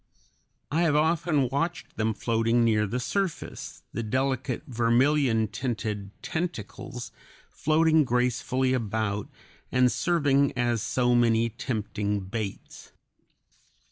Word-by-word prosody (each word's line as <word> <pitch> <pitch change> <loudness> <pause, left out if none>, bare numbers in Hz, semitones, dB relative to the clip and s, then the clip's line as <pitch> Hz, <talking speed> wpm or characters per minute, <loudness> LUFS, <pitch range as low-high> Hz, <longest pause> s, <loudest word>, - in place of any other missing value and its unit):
I 160 +3 +2
have 160 -4 +3
often 155 -2 +2
watched 165 +6 -2
them 110 0 0
floating 115 +1 +1
near 105 -2 +2
the 125 +6 -2
surface, 190 +7 -3
the - - -2
delicate 130 +2 -1
vermilion 120 -1 +2
tinted 105 -3 -3
tentacles 125 - -5 0.4
floating 160 0 +3
gracefully 125 +1 +1
about, 110 -3 -1 0.4
and 125 -1 +4
serving 140 -6 +2
as 120 -2 +1
so 125 +2 +1
many 115 -1 +3
tempting 105 -3 -2
baits. 100 +1 -6
120 Hz, 105 wpm, -27 LUFS, 110-140 Hz, 0.4 s, and